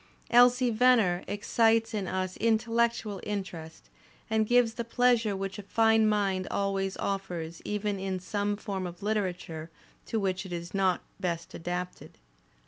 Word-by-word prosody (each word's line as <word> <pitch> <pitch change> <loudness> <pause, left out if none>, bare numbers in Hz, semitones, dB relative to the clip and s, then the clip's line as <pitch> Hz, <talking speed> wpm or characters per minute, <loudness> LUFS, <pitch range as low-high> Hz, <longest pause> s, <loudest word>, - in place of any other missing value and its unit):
"Elsie 245 +1 +6
Venner" 225 -6 +4
excites 225 +3 +2
in 200 -3 -2
us 185 0 -2
intellectual 230 -2 +1
interest 185 -6 -6 0.4
and 220 -1 +2
gives 240 -1 +4
the 235 - -3
pleasure 235 -3 +2
which 195 +1 -4
a - - -4
fine 225 +2 +3
mind 195 -3 0
always 195 -1 -1
offers 175 -4 -4
even 210 -1 -2
in 190 -1 -2
some 205 +2 -2
form 195 -3 -4
of 175 +2 -10
literature 180 -6 -2 0.4
to 225 - -1
which 190 -2 -1
it 190 - -10
is 170 0 -5
not 190 -3 +1 0.2
best 170 -3 -3
adapted. 180 +2 -5
200 Hz, 140 wpm, -29 LUFS, 185-225 Hz, 0.4 s, Elsie